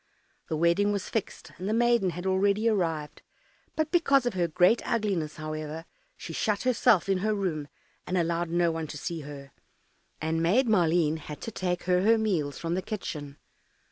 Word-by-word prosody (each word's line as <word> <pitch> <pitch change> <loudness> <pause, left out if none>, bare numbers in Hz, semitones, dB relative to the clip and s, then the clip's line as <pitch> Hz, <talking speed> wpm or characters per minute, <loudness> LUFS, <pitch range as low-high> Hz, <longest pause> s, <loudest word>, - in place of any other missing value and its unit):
The 155 - -1
wedding 170 +5 +3
was 200 -2 -3
fixed, 225 - -4
and 190 +3 -3
the - - +1
maiden 235 -4 +3
had 175 +1 -6
already 200 +3 +2
arrived; 165 -8 -1 0.5
but 315 -1 -1
because 275 -7 +3
of 245 - 0
her 175 -2 +1
great 180 +7 +3
ugliness, 195 -9 -1
however, 155 +1 -5 0.3
she - - -7
shut 210 -3 0
herself 230 -7 +3
in 195 -1 +1
her 215 +2 0
room, 165 -7 -2 0.4
and 185 - 0
allowed 170 0 0
no 170 0 +2
one 160 -1 -4
to 150 - -7
see 170 +2 -4
her, 140 -2 -9 0.7
and 160 +1 -1
Maid 215 +10 +3
Maleen 170 -6 +3
had 150 -1 -8
to 225 - -5
take 180 -3 -2
her 180 0 +2
her 225 +3 +4
meals 175 -10 -1
from 165 0 -3
the 185 - 0
kitchen. 150 -9 -6
180 Hz, 180 wpm, -28 LUFS, 160-210 Hz, 0.7 s, her